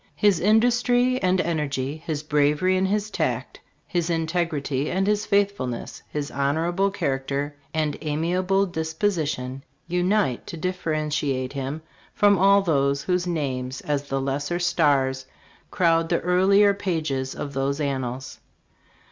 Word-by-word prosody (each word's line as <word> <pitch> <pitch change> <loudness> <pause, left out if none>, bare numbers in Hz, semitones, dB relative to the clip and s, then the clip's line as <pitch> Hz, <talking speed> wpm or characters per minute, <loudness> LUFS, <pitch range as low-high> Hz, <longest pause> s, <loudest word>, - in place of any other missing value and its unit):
His 205 -5 +3
industry 245 +5 +3
and 185 0 +2
energy, 145 -4 -2
his 155 -2 -4
bravery 150 +5 +2
and 190 +1 +2
his 210 +1 -1
tact, - - -2 0.3
his 175 -2 -1
integrity 160 -4 -1
and 190 +2 0
his 210 0 0
faithfulness, 200 -12 -1
his 145 -1 -4
honorable 165 +8 +1
character 140 -5 -2 0.2
and 155 -2 -1
amiable 180 +6 +1
disposition, 160 -6 -2 0.2
unite 180 - 0
to 170 - -6
differentiate 155 -6 -2
him 140 +3 -4 0.3
from 205 -3 +4
all 200 +1 +5
those 140 -4 +1
whose 180 +1 0
names 130 -6 -2
as 145 -1 -2
the 135 0 -1
lesser 140 +5 -2
stars 140 -7 +1 0.4
crowd 165 -3 +2
the 170 - +2
earlier 195 +3 +4
pages 155 -9 -2
of 145 - -5
those 135 +2 -1
an 140 -3 -1
nals. 125 +1 -6
160 Hz, 130 wpm, -24 LUFS, 140-185 Hz, 0.4 s, all